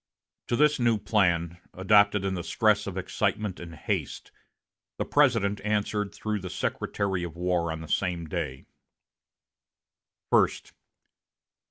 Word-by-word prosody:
To -, -, 0 dB
this 150 Hz, +2 st, +3 dB
new 120 Hz, -2 st, +3 dB
plan, 90 Hz, -5 st, +1 dB, 0.2 s
adopted 100 Hz, +1 st, +4 dB
in 95 Hz, -, 0 dB
the 90 Hz, -2 st, -3 dB
stress 105 Hz, 0 st, +2 dB
of 95 Hz, -1 st, -5 dB
excitement 100 Hz, +1 st, -2 dB
and 85 Hz, -1 st, -9 dB
haste, -, -, -4 dB, 0.7 s
the -, -, -2 dB
President 115 Hz, -8 st, +2 dB
answered 105 Hz, -1 st, -1 dB
through 110 Hz, -1 st, -3 dB
the 95 Hz, -1 st, -6 dB
Secretary 95 Hz, 0 st, -2 dB
of 85 Hz, -2 st, -6 dB
War 90 Hz, -2 st, 0 dB
on 80 Hz, 0 st, -5 dB
the 80 Hz, -, -8 dB
same 90 Hz, -2 st, -1 dB
day: 75 Hz, -5 st, -4 dB, 1.7 s
"First. -, -, +2 dB
100 Hz, 130 wpm, -27 LUFS, 85-105 Hz, 1.7 s, adopted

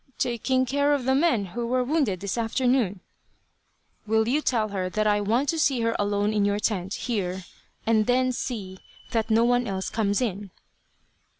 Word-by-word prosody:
"Taking 255 Hz, +2 st, 0 dB
care 285 Hz, +3 st, +2 dB
of 265 Hz, -4 st, -4 dB
the 265 Hz, -, +3 dB
men 270 Hz, -8 st, +2 dB
who 235 Hz, 0 st, -3 dB
were 250 Hz, +1 st, +1 dB
wounded 255 Hz, -, 0 dB
this 200 Hz, -1 st, -2 dB
afternoon." 235 Hz, -4 st, 0 dB, 1.1 s
"Will 220 Hz, +1 st, +2 dB
you 280 Hz, +5 st, +1 dB
tell 225 Hz, -7 st, 0 dB
her 185 Hz, -2 st, -2 dB
that 215 Hz, +3 st, -1 dB
I 205 Hz, -1 st, +2 dB
want 235 Hz, +7 st, +1 dB
to 325 Hz, -, 0 dB
see 275 Hz, -5 st, +2 dB
her 230 Hz, 0 st, 0 dB
alone 205 Hz, +1 st, 0 dB
in 210 Hz, -1 st, +2 dB
your 200 Hz, 0 st, +1 dB
tent, 200 Hz, -2 st, -1 dB
here, 190 Hz, -6 st, -3 dB, 0.4 s
and 220 Hz, -1 st, +2 dB
then 255 Hz, +1 st, +2 dB
see 200 Hz, -7 st, -5 dB, 0.3 s
that 225 Hz, -1 st, 0 dB
no 225 Hz, +1 st, +4 dB
one 245 Hz, 0 st, +2 dB
else 190 Hz, -1 st, -3 dB
comes 205 Hz, -2 st, 0 dB
in?" 205 Hz, -5 st, -3 dB
225 Hz, 180 wpm, -25 LUFS, 205-255 Hz, 1.1 s, no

